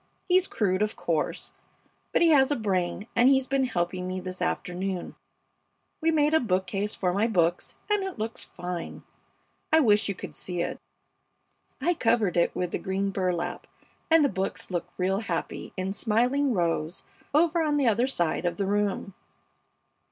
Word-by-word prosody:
He's 370 0 +4
crude, 190 -3 0
of 210 0 0
course, 160 -3 -2 0.6
but - - +3
he 335 - +6
has 275 -3 +5
a 290 - +2
brain, 195 -3 -1
and 245 +2 +6
he's 265 -1 +4
been 270 0 +1
helping 180 -4 -2
me 185 0 -3
this 185 0 -7
afternoon. 180 +1 -2 0.9
We 325 - +3
made 305 -1 +3
a 320 - +6
bookcase 195 - -1
for 180 -2 0
my 205 +4 +2
books, 175 -5 0
and 415 -2 +1
it 385 -1 -5
looks 220 +1 -4
fine. 175 -1 -6 0.7
I 320 - +6
wish 210 -7 +3
you 200 - -2
could - - -8
see 175 -2 -3
it. - - -4 1.0
I 335 +7 +2
covered 225 - +1
it 170 - +2
with 180 -1 -2
the - - -2
green 195 +1 -1
burlap, 180 -3 -2 0.4
and 325 -2 +6
the - - +2
books 190 -1 -3
look 175 -1 -2
real 190 +2 +1
happy 175 -7 -4
in 185 +1 -2
smiling 245 +7 +1
rows 170 -3 -1 0.3
over 330 +3 +3
on 300 -2 +1
the 275 -3 +2
other 230 +3 +3
side 175 -13 0
of 175 -1 -1
the 200 - 0
room. 200 0 -1
200 Hz, 170 wpm, -27 LUFS, 180-265 Hz, 1.0 s, he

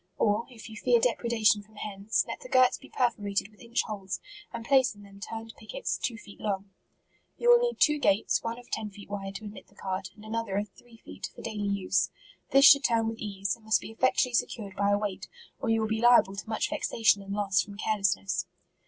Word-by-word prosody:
Or, 210 +2 +1
if 235 -3 -11
you 220 - -10
fear 475 - +3
depredation 235 - +2
from 215 +1 -22
hens, 205 0 -1
let - - -5
the - - -11
girts 255 - +4
be 275 - -15
perforated 205 -5 0
with 210 - -21
inch 235 0 -1
holes, 200 -3 -5 0.3
and 230 -1 -6
place 260 -3 +4
in 205 - -14
them 200 0 -15
turned 225 +2 -7
pickets, 350 - -3
two 230 - -3
feet 200 -2 -14
long. 210 - -1
MARCH* 195 0 -3
S3 195 -1 -35
Yotf 475 - +1
will 480 0 +8
need 480 0 -1
two 300 -1 +4
gates, 200 -6 +2
one 230 0 -4
of 245 - -13
ten 215 -1 -2
(eei 205 0 -13
wide, 195 -1 -5
to 220 - -7
admit 205 -1 -10
the 200 - -25
cart, 190 -1 -4
and 215 - -14
another 220 -3 -2
of 205 0 -2
three 235 +3 -19
feet, - - -8
for - - -10
daily 210 -2 -3
use. 190 -2 +1 0.4
This 275 +1 +6
should 280 0 +9
turn 225 -2 +2
with 225 0 -7
ease, 200 -2 -2
and 230 - -23
must 220 0 +3
be - - -9
effectually 250 +1 +2
secured 205 -4 -2
by 200 0 +1
a 205 - +4
weight, 205 -2 -4 0.3
or 240 - -2
you 225 0 +3
will 220 - 0
be 220 0 -1
liable 240 -5 +5
to 200 - -7
much 220 +6 -1
vexa 295 -6 -3
tion 205 -2 +6
and 195 0 -6
loss, 200 -3 +2
from 200 +3 -9
carelessness. 200 -2 0
215 Hz, 235 wpm, -28 LUFS, 200-235 Hz, 0.4 s, should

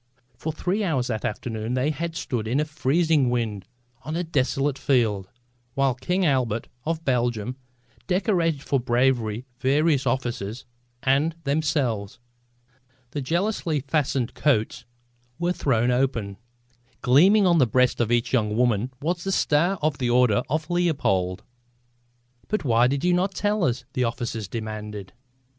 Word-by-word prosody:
For 160 +7 -4
three 185 +7 -1
hours 145 -10 0
that 110 -3 -2
afternoon 110 +2 -3
they 130 +4 +1
had 165 +1 -4
stood 115 -8 -3
in 125 +6 +1
a 150 - +1
freezing 155 -1 +2
wind 110 -6 -2 0.3
on 155 +3 -5
a 175 - -1
desolate 140 -2 0
field, 110 -8 +1 0.5
while 135 -1 +2
King 180 +9 -1
Albert 125 -6 0 0.2
of 165 0 -2
Belgium 120 -2 0 0.5
decorated 175 -6 +1
for 140 - +1
bravery 120 -2 +1
various 140 +1 +2
officers 120 -3 -2 0.4
and 140 +5 +2
themselves. 140 -8 -1 0.9
The 145 - -3
jealously 170 +1 0
fastened 135 -3 -1
coats 130 -7 0 0.5
were 175 +1 0
thrown 125 -6 +1
open. 120 -6 0 0.7
Gleaming 190 +11 +5
on 170 -2 +4
the 130 - +4
breast 125 +2 +2
of 120 0 0
each 120 +1 +1
young 105 -3 +1
woman 120 0 +1
was 170 +2 -1
the 195 - -2
star 175 +2 +2
of 155 -2 0
the 125 -2 0
Order 125 -2 +4
of 155 +2 -1
Leopold! 135 - 0 1.0
"But 215 -4 -1
why 120 -1 +4
did 135 +2 -1
you 180 - +4
not 185 +2 0
tell 205 -2 +1
us?" 125 0 -1
the 125 - +1
officers 115 -2 -3
demanded. 105 -3 -6
130 Hz, 145 wpm, -24 LUFS, 115-160 Hz, 1.0 s, Gleaming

